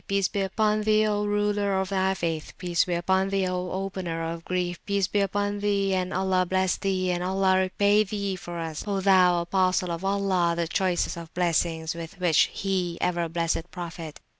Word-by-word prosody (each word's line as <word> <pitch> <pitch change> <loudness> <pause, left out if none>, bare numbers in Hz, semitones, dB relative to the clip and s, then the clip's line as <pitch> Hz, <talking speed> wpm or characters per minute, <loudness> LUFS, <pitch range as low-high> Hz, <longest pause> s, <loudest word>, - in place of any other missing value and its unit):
Peace 195 -1 +1
be 200 - -2
upon 210 +2 +1
Thee, 215 0 +3
O 210 -1 0
Ruler 205 -1 +1
of 190 0 -2
Thy 190 -1 +1
Faith! 165 -3 -3
Peace 175 -2 +1
be 180 - -1
upon 190 +2 +1
Thee, 195 -1 0
O 180 0 -2
Opener 185 -3 -3
of 165 0 -7
Grief! 180 -1 -2
Peace 200 -1 +1
be 195 +4 -1
upon 205 +1 -1
Thee! 200 -1 +1
and 185 0 -1
Allah 190 -1 +1
bless 185 0 +1
Thee! 185 -2 -1
and 175 0 -1
Allah 190 0 +2
repay 200 +3 +3
Thee 200 -1 -3
for 175 -1 -7
us, 160 -2 -4
O 200 -1 0
Thou 185 -2 +4
Apostle 185 0 +1
of 170 +2 -4
Allah! 195 -3 +1
the 170 -1 -1
choicest 180 0 0
of 165 -1 -9
Blessings 165 -2 0
with 170 +2 -8
which 175 -4 +3
He 185 -3 -2
ever 170 -2 0
blessed 165 +1 -1
Prophet! 165 -3 -7
185 Hz, 190 wpm, -26 LUFS, 175-195 Hz, -, Thou